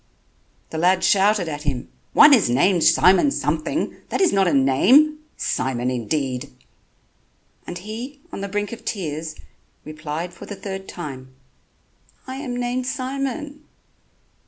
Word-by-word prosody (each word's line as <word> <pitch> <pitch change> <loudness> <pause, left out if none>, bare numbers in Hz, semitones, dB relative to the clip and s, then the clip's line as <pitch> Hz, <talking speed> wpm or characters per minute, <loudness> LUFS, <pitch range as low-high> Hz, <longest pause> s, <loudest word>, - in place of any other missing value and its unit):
The 160 - -3
lad 185 +2 +3
shouted 200 -2 +3
at 150 -2 -4
him: 140 -4 -3 0.2
"One 295 -1 +8
is 230 - +4
named 170 +8 +3
Simon 190 +10 +5
something... 160 - -2
that - - -2
is 380 -3 +3
not 195 -1 +3
a - - +2
name... 240 - +4 0.2
Simon 125 -1 -1
indeed." 125 +1 -2 1.2
And 175 - -5
he, 230 +9 -7
on - - -6
the 200 - -3
brink 205 0 -2
of 235 0 -8
tears, 160 -7 -4 0.5
replied 155 +3 -5
for - - -11
the 205 - -6
third 195 -1 -7
time: 130 -6 -8 0.9
"I 260 0 -6
am 255 -3 -4
named 245 +1 -2
Simon." 275 +3 -4
190 Hz, 135 wpm, -22 LUFS, 150-245 Hz, 1.2 s, One